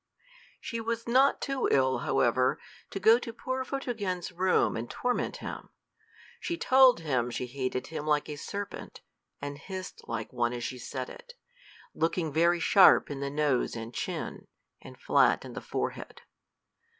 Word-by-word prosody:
She 230 -1 -4
was 230 +1 -3
not 265 +4 +4
too 275 -2 -1
ill, 130 -2 +3
however, 125 +2 +2 0.3
to 195 - -5
go 220 +5 +6
to 235 - -6
poor 260 +3 -3
Photogen's 220 -11 -3
room 185 +1 +2
and 115 +1 -4
torment 250 0 -1
him. - - -7 0.7
She 340 - -3
told 260 - +5
him 130 -6 0
she 125 - -3
hated 130 0 -3
him 155 -1 -6
like 150 -1 +2
a 150 - -5
serpent, 200 +7 -7 0.4
and 145 0 -5
hissed 185 +3 -7
like 115 0 -4
one 120 -1 0
as 120 -1 -5
she 125 +2 -4
said 130 +1 -5
it, - - -13 0.6
looking 165 -2 -1
very 170 +2 +3
sharp 185 -2 +6
in 140 - -4
the 140 0 -2
nose 145 -4 0
and 115 +1 -6
chin, - - -5 0.3
and - - -13
flat - - +3
in - - -9
the - - -6
forehead. - - -4
160 Hz, 160 wpm, -29 LUFS, -, 0.7 s, go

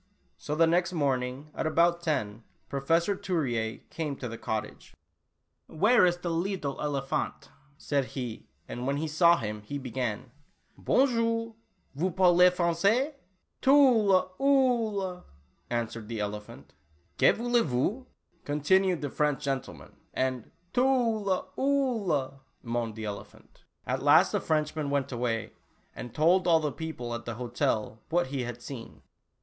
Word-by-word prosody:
So 150 - -4
the 165 +1 +5
next 175 +2 +1
morning 135 -1 -1
at - - -2
about 170 +2 +3
ten 110 -9 -2 0.3
Professor 165 +8 +1
Turier 120 -13 -2
came 155 -4 -3
to 130 - -6
the 115 - -6
cottage. 110 -1 -5 0.7
"Where 205 +4 +4
ees 175 - +1
de 175 - -6
leedle 165 -4 -2
elephante?" 140 -2 -2 0.3
said 140 -3 -1
he, 125 -4 -6 0.2
and 125 +1 -5
when 140 +1 0
he 160 +2 -2
saw 170 +3 +5
him, 105 -3 -4
he 125 +8 -5
began: 125 -2 -4 0.2
" - - -42
Bonjour, 230 -3 +1 0.4
vous 165 +7 0
parlez 180 0 +5
Francais?" 195 - +1 0.5
"Tula 235 -10 +5
Oolah," 230 -9 +1 0.5
answered 115 -2 -3
the 115 -1 -4
elephant. 105 -9 -6 0.5
"Que - - +7
voulez 240 +1 +1
vous? 155 - -1 0.2
" 175 - -40
continued 180 +5 +2
the 145 - -2
French 150 -2 0
gentleman, 135 -2 -4 0.2
and 130 -3 -1 0.2
"Tula 230 -7 +1
Oolah, 225 - 0
" - - -43
moaned 115 -2 -2
the 110 -1 -6
ele 100 -1 -4
phant. - - -23 0.2
At - - -2
last - - +5
the - - 0
Frenchman 155 -1 -1
went 140 -1 -1
away, 115 -3 -2 0.4
and 120 - -7
told 175 +6 +3
all 165 -2 +5
the 150 -2 -2
people 135 -7 -5
at 115 0 -5
the 120 - -4
hotel 115 -2 -2
what 175 +2 +2
he 135 - -1
had 120 0 -7
seen. 120 -5 -9
155 Hz, 145 wpm, -28 LUFS, 125-185 Hz, 0.7 s, Que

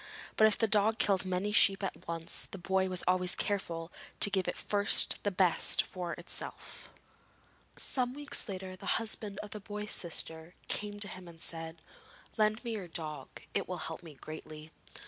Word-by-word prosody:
But 220 - +7
if 215 - +2
the 225 - +3
dog 215 +1 +3
killed 195 -3 +2
many 185 +2 -1
sheep 200 -1 +5
at 195 - -5
once, 165 -1 -2
the - - -8
boy 190 +1 +1
was 185 -1 +2
always 180 0 +3
careful 170 -5 -2 0.3
to 205 - +9
give 190 -2 +1
it - - -2
first 205 -1 +5
the 205 - +1
best 185 -3 +3
for 175 -2 -5
itself. 170 +2 -5 0.9
Some 250 -1 0
weeks 290 -5 -1
later 185 -1 -5
the - - -1
husband 215 -2 -3
of 210 - -9
the 210 - -5
boy's 210 +1 -6
sister 165 0 -2
came 205 0 -3
to 205 - 0
him 185 -1 -9
and 165 -1 -13
said: 165 0 -1 0.5
'Lend 215 +1 +2
me 235 - -3
your 205 -5 -4
dog, 155 -4 -7
it - - 0
will - - -3
help - - -6
me 160 -4 -12
greatly.' 155 +1 -9
190 Hz, 180 wpm, -32 LUFS, 170-210 Hz, 0.9 s, to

